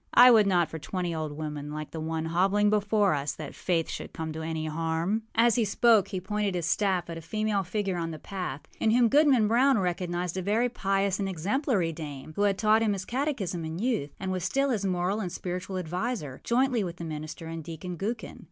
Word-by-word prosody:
I 250 +1 +10
would 215 -3 +6
not 175 -4 +3
for 160 - -7
twenty 175 +1 -3
old 155 -2 -3
women 150 -1 -5
like 155 0 -6
the 160 - -5
one 160 0 -2
hobbling 195 +5 +2
before 205 -2 +3
us 145 0 -1
that 155 -3 -7
Faith 170 -3 0
should - - -6
come 160 -1 -4
to 160 - -5
any 160 0 -3
harm.â 165 +6 -1
As 230 +1 +5
he 235 - +3
spoke 215 0 +4
he 190 - -3
pointed 205 0 -1
his 175 -3 -1
staff 185 +1 +1
at 165 -1 -6
a - - -10
female 215 +4 -1
figure 195 0 -2
on 165 -1 -2
the 160 - -6
path, 180 -7 -5 0.2
in 220 - +2
whom 235 +1 +4
Goodman 275 -6 +5
Brown 255 +4 +4
recognized 180 -1 -2
a - - 0
very 220 +6 +1
pious 195 -3 0
and 195 -1 -1
exemplary 190 - 0
dame, 150 -2 -7
who - - -1
had 200 -1 +3
taught 215 +2 +4
him 215 -2 +2
his 190 -1 -4
catechism 235 - -2
in 160 +1 -4
youth, 220 - 0
and 190 -1 -3
was 185 -2 -2
still 275 +7 +1
his 205 -5 -1
moral 185 +3 0
and 185 -5 -3
spiritual 185 +1 -4
adviser, 180 - -3
jointly 245 -2 +2
with 175 -2 -4
the 170 - -7
minister 155 +1 -6
and 165 0 -6
Deacon 170 +3 -6
Gookin. 220 +6 -4
185 Hz, 220 wpm, -28 LUFS, 165-215 Hz, 0.2 s, I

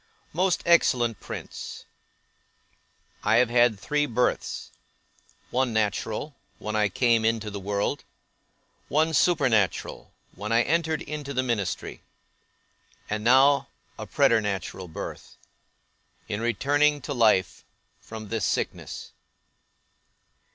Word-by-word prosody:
MOST 180 +2 +1
EXCELLENT 120 - +3
PRINCE, - - -8 1.4
I 105 +2 +3
have 120 0 +4
had 120 -3 +4
three 145 +6 0
births; 125 0 -1 0.8
one, 125 -1 +1
natural, 110 +6 -1 0.2
when 110 0 -4
I 105 -1 +2
came 115 +2 +2
into 110 -1 0
the 100 - -5
world; 100 +1 -2 0.8
one, 160 +2 +1
supernatural, 130 - +1 0.2
when 105 +4 -6
I 115 +1 +4
entered 160 0 0
into 145 -2 -6
the 130 - +1
ministry; 115 -7 -3 1.1
and 105 0 -2
now, 135 +4 +5 0.3
a - - -6
preternatural 100 -4 +1
birth, 80 - -8 0.9
in 105 +1 -3
returning 145 +5 +2
to 140 - -4
life, 110 -7 +2 0.4
from 110 -2 -9
this 115 -3 -2
sickness. - - -3
120 Hz, 105 wpm, -26 LUFS, 105-140 Hz, 1.4 s, now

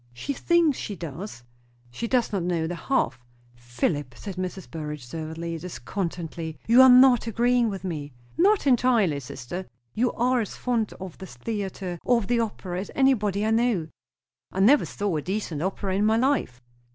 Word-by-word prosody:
"She 200 - -4
thinks 335 -1 +2
she 205 - -4
does." 165 - -7 0.5
"She 230 - -4
does 245 -3 +1
not 195 - 0
know 170 -2 0
the 170 - -3
half." 170 - 0 0.3
"Philip," 120 +3 -2
said 195 -3 -7
Mrs. 185 0 -5
Burrage 150 -4 -6
severely 160 +4 -5
and 165 -2 -5
discontentedly, 170 -3 -5
"you 235 +3 +7
are 260 - +9
not 250 -2 +7
agreeing 240 +1 +2
with 195 -2 -5
me." 150 -6 -4 0.2
"Not 395 +2 +3
entirely, 235 - +3
sister." 140 +8 -7 0.3
"You 245 +2 +1
are 250 +1 +2
as 210 - -5
fond 235 -4 -1
of 185 -3 -9
the 190 - -8
theatre, 185 - -5
or 245 - +3
of 230 - -2
the 240 +4 +1
opera, 190 -5 -3
as 195 - -5
anybody 215 -7 +2
I 220 - +1
know." 225 -8 +1 0.6
"I 190 - -4
never 255 +10 +5
saw 200 -5 -2
a - - -2
decent 185 -4 -3
opera 190 +1 -2
in 205 +2 +2
my 220 +1 +3
life." 230 - 0
195 Hz, 175 wpm, -25 LUFS, 165-235 Hz, 0.6 s, are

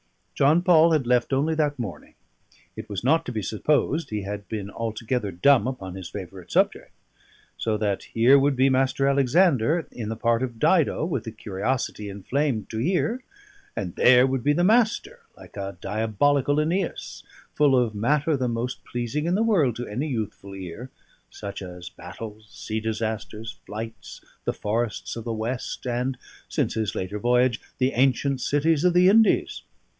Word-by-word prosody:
John 155 +5 +3
Paul 165 -2 +5
had 150 -5 +1
left 125 +1 +2
only 145 +4 +1
that 150 -2 0
morning; 100 -11 -7 0.6
it 110 - -8
was 100 0 -4
not 160 +6 +3
to - - -3
be 110 -3 -3
supposed 150 - 0
he 105 -2 -3
had 100 0 -6
been 100 -2 -4
altogether 115 0 -2
dumb 120 +7 +4
upon 95 -9 -5
his 95 -2 -7
favourite 95 -2 -9
subject: - - +1 0.7
so 110 -1 0
that 100 -2 -1
here 125 +5 +5
would 140 0 +2
be 130 +1 +4
Mr. 135 +1 +2
Alexander 140 +2 +3
in 110 -3 -5
the 110 - -3
part 115 +1 +1
of 120 -3 -3
Dido, 160 +2 +2
with 165 -8 -3
a - - -3
curiosity 105 +1 -3
inflamed 110 +3 -2
to 110 - -3
hear; 190 - 0 0.5
and 90 -3 -4
there 125 0 +6
would 130 -2 -1
be 145 - +3
the 175 - +1
Master, 220 +3 +2 0.2
like - - -15
a 100 -2 -5
diabolical 115 +8 +1
Æneas, 165 +5 -2 0.3
full 145 -3 +4
of 120 -3 +1
matter 145 +9 +1
the 130 -2 -1
most 120 +2 -3
pleasing 120 +6 -3
in 175 - +2
the 215 - +2
world 165 - +2
to 120 - -5
any 125 +9 -3
youthful 105 -6 -5
ear, 95 +7 -8 0.4
such 100 0 -7
as 90 -1 -8
battles, 105 +5 -10
sea 110 0 -4
disasters, 110 0 -4
flights, 110 +2 -7 0.3
the - - 0
forests 110 +1 -2
of 115 - -6
the 115 - -3
West, 115 +5 -4
and 125 +2 -1 0.3
(since - - 0
his 110 -2 -2
later 95 +3 -3
voyage) 125 +1 +2 0.2
the 130 0 +2
ancient 135 +1 +1
cities 150 +2 +1
of 180 -1 +3
the 180 +1 +6
Indies. 220 +2 +4
125 Hz, 170 wpm, -25 LUFS, 110-145 Hz, 0.7 s, there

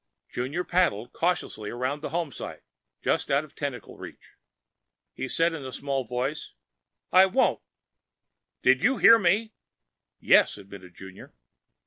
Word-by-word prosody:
Junior 140 +9 -3
paddled 170 - 0
cautiously 165 -11 -2
around 130 +4 -3
the - - -5
homesite, 165 -3 -5 0.4
just - - 0
out 140 +2 +2
of 155 - -15
tentacle 135 -6 -6
reach. - - -12 0.8
He 130 - -5
said 165 +4 +1
in 155 -4 -6
a 130 - -7
small 135 -1 -3
voice, 125 - -4 0.6
"I 185 +1 +7
won't." 255 +8 +1 1.0
"DID 130 +1 +4
YOU 245 +7 +2
HEAR 230 0 +7
ME?" 210 +4 +1 0.7
"Yes," - - +4
admitted 95 -3 -13
Junior. 95 0 -13
140 Hz, 130 wpm, -26 LUFS, 125-175 Hz, 1.0 s, I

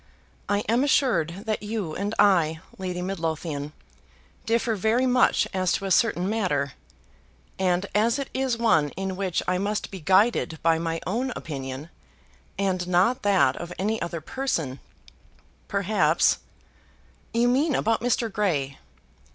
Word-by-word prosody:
"I 205 0 +2
am 235 +4 +3
assured 200 - +1
that 215 -1 -1
you 210 -6 -3
and 205 +3 -2
I, 170 -6 +4 0.2
Lady 180 -1 -3
Midlothian, 160 -5 -3 0.8
differ 230 0 +1
very 220 +5 +1
much 255 0 +3
as 185 -2 +1
to 195 - -2
a 195 - -2
certain 185 -2 +2
matter; 180 -11 0 0.9
and 185 0 +1
as 225 +4 +2
it 275 -2 -3
is 260 -3 0
one 160 -11 +3
in 190 -1 -3
which 185 -3 -1
I 180 0 +1
must 210 +2 -2
be 190 - -7
guided 190 0 +2
by 165 0 +3
my 165 0 -2
own 245 +7 -1
opinion, 135 0 -6 0.7
and 185 -2 -1
not 185 +8 +2
that 195 -10 +3
of 175 0 -7
any 215 +3 -1
other 170 -1 -4
person, 165 - -2 0.9
perhaps 190 -5 +2 0.5
" - - -33
"You 235 +1 +3
mean 275 +4 +2
about 225 +1 +1
Mr. 235 -2 0
Grey?" 145 -10 -1
190 Hz, 145 wpm, -25 LUFS, 165-225 Hz, 0.9 s, I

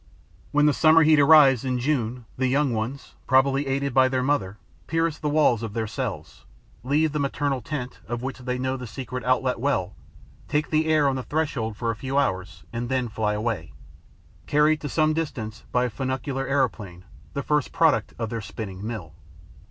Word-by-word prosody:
When 145 0 +3
the 150 - +4
summer 160 +3 +5
heat 155 -1 +5
arrives, 140 -4 +7
in 130 -1 -1
June, 125 -3 -1
the 130 0 0
young 135 0 +1
ones, 115 +6 -4
probably 135 +1 +3
aided 135 0 -1
by 130 0 +5
their 130 -1 0
mother, 110 -8 0 0.3
pierce 165 -1 0
the 150 - -1
walls 145 -7 +3
of 110 -3 -5
their 115 0 -1
cells, 105 - -5 0.4
leave 150 +4 +2
the 150 - -2
maternal 140 -1 -1
tent, 125 0 -5
of 120 +1 -4
which 135 0 -4
they 125 0 -3
know 130 +1 -2
the 125 -1 -7
secret 125 +2 -6
outlet 130 -1 +1
well, 100 -9 0 0.5
take 150 0 -1
the 155 0 +2
air 155 -2 +3
on 135 -1 0
the - - -2
threshold 125 -6 -2
for 115 0 -1
a - - -5
few 135 +5 -3
hours 95 -9 -1
and 120 +1 -3
then 130 -2 0
fly 105 -1 -1
away, 105 -6 -3 0.7
carried 150 +1 +3
to 145 - -4
some 155 +2 +2
distance 115 -9 -4
by 125 0 +2
a - - -1
funicular 135 +2 -3
aeroplane, 110 -10 -1 0.3
the 140 - -3
first 150 -1 0
product 155 -10 +2
of 115 -2 -4
their 115 -1 -3
spinning 100 -2 -7
mill. 105 -8 -6
130 Hz, 190 wpm, -25 LUFS, 115-145 Hz, 0.7 s, arrives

